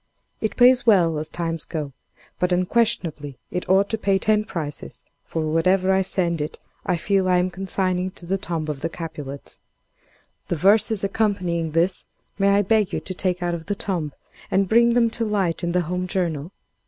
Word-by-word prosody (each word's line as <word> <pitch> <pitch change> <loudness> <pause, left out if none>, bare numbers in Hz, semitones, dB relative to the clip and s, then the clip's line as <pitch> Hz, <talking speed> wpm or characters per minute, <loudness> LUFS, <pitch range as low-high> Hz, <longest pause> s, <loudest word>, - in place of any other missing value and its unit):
It 220 -2 -3
pays 250 +1 +6
well 175 -9 +4
as 155 - -4
times 165 -2 -3
go 150 -4 -5 0.5
but 180 +1 +1
unquestionably 180 - 0
it 180 - -4
ought 195 +1 +4
to 220 - -1
pay 195 -2 +2
ten 215 +2 +2
prices; 155 -8 -6 0.2
for 160 - -3
whatever 185 +5 +2
I 190 - +3
send 175 -4 0
it 150 - -4 0.3
I 180 -2 +2
feel 190 +2 +1
I 180 - +4
am 180 +1 +1
consigning 185 -1 -1
to 175 - -8
the 195 +3 -1
tomb 165 -4 -3
of 145 -3 -4
the 165 - -1
Capulets. 150 -5 -8 0.9
The - - -1
verses 200 +4 +3
accompanying 185 -6 0
this, 175 +3 +1 0.3
may 195 0 +4
I 205 - +3
beg 210 0 +2
you - - 0
to 185 - -6
take 180 0 -1
out 175 0 0
of 165 -1 -6
the 205 - -1
tomb, 175 -7 -2 0.4
and 195 0 +2
bring 235 +3 +4
them 235 -2 +3
to 230 - -2
light 195 -6 0
in 175 - 0
the 180 +1 +2
'Home 180 +2 -3
Journal? 170 -3 -2
180 Hz, 190 wpm, -23 LUFS, 165-200 Hz, 0.9 s, pays